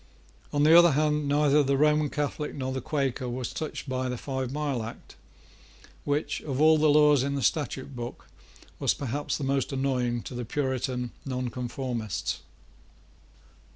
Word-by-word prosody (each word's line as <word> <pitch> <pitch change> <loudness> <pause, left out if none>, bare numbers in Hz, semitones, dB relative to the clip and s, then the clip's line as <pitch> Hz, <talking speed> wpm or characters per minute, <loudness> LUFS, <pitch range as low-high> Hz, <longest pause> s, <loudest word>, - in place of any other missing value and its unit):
On 145 0 +2
the 160 +2 +7
other 175 -2 +8
hand, 150 0 +1
neither 145 0 +4
the 140 -1 +1
Roman 150 0 +3
Catholic 150 +1 -3
nor 130 -1 -3
the 130 - -3
Quaker 135 -3 -1
was 125 0 -4
touched 155 -2 -5
by 130 -1 -2
the 125 - -3
Five 130 -1 -3
Mile 145 -4 -1
Act, 110 +1 -9 0.9
which, 145 +1 -1
of 135 -3 -4
all 155 +1 +6
the 155 0 +4
laws 150 -2 +5
in 140 +1 -1
the 140 - -2
Statute 140 -3 -1
Book, 120 0 -7 0.5
was - - +2
perhaps 140 +2 -2
the 145 - -5
most 135 -1 0
annoying 125 -3 0
to - - -8
the 125 0 -4
Puritan 125 -1 -2
Nonconformists. 125 -3 -3
135 Hz, 155 wpm, -27 LUFS, 125-150 Hz, 0.9 s, other